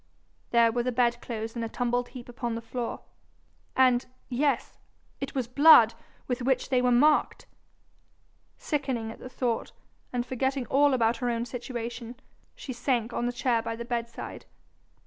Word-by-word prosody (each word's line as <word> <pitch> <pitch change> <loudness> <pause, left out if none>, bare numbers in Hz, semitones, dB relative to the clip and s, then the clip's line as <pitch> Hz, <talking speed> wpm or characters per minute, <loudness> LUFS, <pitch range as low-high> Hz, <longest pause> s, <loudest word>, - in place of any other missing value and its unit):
There 235 -1 +4
were 240 +1 0
the 250 +1 -1
bedclothes 235 -2 -1
in 235 - -3
a 225 - -3
tumbled 245 +1 -1
heap 245 -2 -10
upon 240 -1 -4
the 230 - -4
floor! 240 0 -4 0.7
And 255 -1 +4 0.3
yes 275 +3 0 0.4
it 275 - -5
was 255 -3 -1
blood 250 -4 +7 0.3
with 250 0 -2
which 260 +1 0
they 255 -2 +3
were 250 0 +3
marked! 295 +5 +3 1.1
Sickening 265 -7 -2
at - - -12
the 255 - -9
thought, 245 -3 -2 0.4
and 245 -1 -1
forgetting 265 +1 -1
all 280 0 +4
about 230 -1 +2
her 245 0 -1
own 235 0 -1
situation, 240 -1 -6 0.4
she 260 - -7
sank 240 -1 -1
on 240 - -1
the - - 0
chair 245 -2 +1
by 230 0 -4
the 235 +1 -6
bedside. 235 -1 -5
245 Hz, 160 wpm, -28 LUFS, 235-255 Hz, 1.1 s, blood